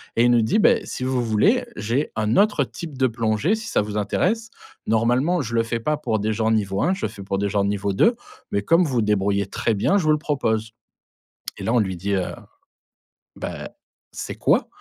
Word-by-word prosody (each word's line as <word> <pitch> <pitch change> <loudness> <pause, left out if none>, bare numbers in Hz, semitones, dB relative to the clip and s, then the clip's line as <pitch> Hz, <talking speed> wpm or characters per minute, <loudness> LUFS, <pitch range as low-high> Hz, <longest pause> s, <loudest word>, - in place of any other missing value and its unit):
et 115 - +4
il 120 - +5
nous 120 - +5
dit: 110 - +2
«Beh, - - +5
si 130 - -5
vous 130 -1 0
voulez, 120 - +2
j'ai 120 +7 -1
un 110 +2 0
autre 205 +1 +3
type 160 -6 -8
de 130 0 +3
plongée 115 - 0
si 220 0 -3
ça - - +1
vous 105 0 -4
intéresse. 215 - 0 0.4
Normalement 125 +10 +2
je 120 -3 -5
le 115 - +3
fais 115 0 -2
pas 150 +4 0
pour 110 -7 -1
des 110 +2 -1
gens 110 +1 0
niveau 100 -3 0
1, 185 - +2
je 190 - -2
fais 100 - -11
pour 95 0 -2
des 100 0 0
gens 100 -1 +1
niveau 100 0 -1
2, 230 - +4 0.4
mais 100 - 0
comme 165 - +4
vous 125 -6 0
débrouillez 100 -1 +1
très 115 - -1
bien, 110 - +2
je 190 - 0
vous 155 - +3
le 150 - +3
propose», 115 -8 -1 0.9
et - - -7
là 115 - 0
on 125 - +4
lui 95 -4 -1
dit: 100 +4 -3
«Heu, 95 - -2 1.0
beh, - - -6 0.4
c'est - - -6
quoi?» - - +2
115 Hz, 220 wpm, -22 LUFS, 105-150 Hz, 1.0 s, il